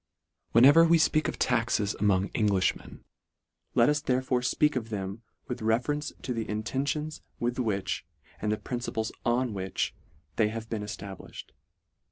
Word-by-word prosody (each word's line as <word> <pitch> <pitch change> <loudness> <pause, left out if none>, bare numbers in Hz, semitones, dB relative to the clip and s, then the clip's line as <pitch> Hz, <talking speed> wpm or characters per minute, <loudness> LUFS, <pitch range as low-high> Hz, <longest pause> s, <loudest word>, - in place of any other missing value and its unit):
Whenever 140 +8 +8
we 165 0 +5
fpeak 155 -1 +2
of - - -3
taxes 115 -4 +1
among 100 -1 +2
Englifhmen, 100 -4 0 0.7
let 115 - +5
us 150 0 +2
therefore 130 -2 +1
fpeak. 150 +4 +2
of 115 -3 -2
them 100 0 -4 0.3
with 125 -3 -4
reference 125 +7 0
to 125 - -2
the 115 -2 -3
intentions 135 +8 -2 0.2
with 120 +1 -1
which, 105 -6 -1 0.4
and 105 - 0
the 105 - +1
principles 120 -3 -3
on 120 0 +1
which 95 -1 -2 0.4
they 110 - +4
have 115 +1 -5
been 110 -2 -2
eftabliftied. 100 -3 -8
115 Hz, 145 wpm, -28 LUFS, 105-130 Hz, 0.7 s, Whenever